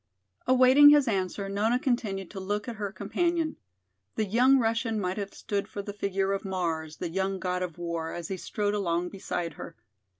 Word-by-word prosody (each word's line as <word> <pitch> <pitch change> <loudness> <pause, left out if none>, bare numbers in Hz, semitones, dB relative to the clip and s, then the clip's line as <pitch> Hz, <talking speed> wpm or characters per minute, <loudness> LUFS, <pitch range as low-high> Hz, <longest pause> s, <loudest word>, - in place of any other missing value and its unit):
Awaiting 260 +3 +8
his 290 -2 +5
answer, 195 -1 -1
Nona 210 +5 +1
continued 220 - -2
to 195 - -6
look 205 +3 -3
at 235 -2 -5
her 205 -2 -3
companion. 320 - -1 0.6
The 220 - 0
young 250 +7 +4
Russian 225 -2 0
might 185 0 -2
have 200 -1 -4
stood 200 -1 -3
for 200 - -6
the 205 - -6
figure 195 -1 -1
of 195 - -3
"Mars," 165 -5 -3
the 175 - -4
young 190 +2 -1
god 180 -1 -2
of 180 -3 -4
war, 170 -1 -3
as 170 -1 -6
he 190 - -3
strode 205 +3 -2
along 180 -3 0
beside 175 -4 -4
her. - - -9
200 Hz, 190 wpm, -28 LUFS, 185-225 Hz, 0.6 s, Awaiting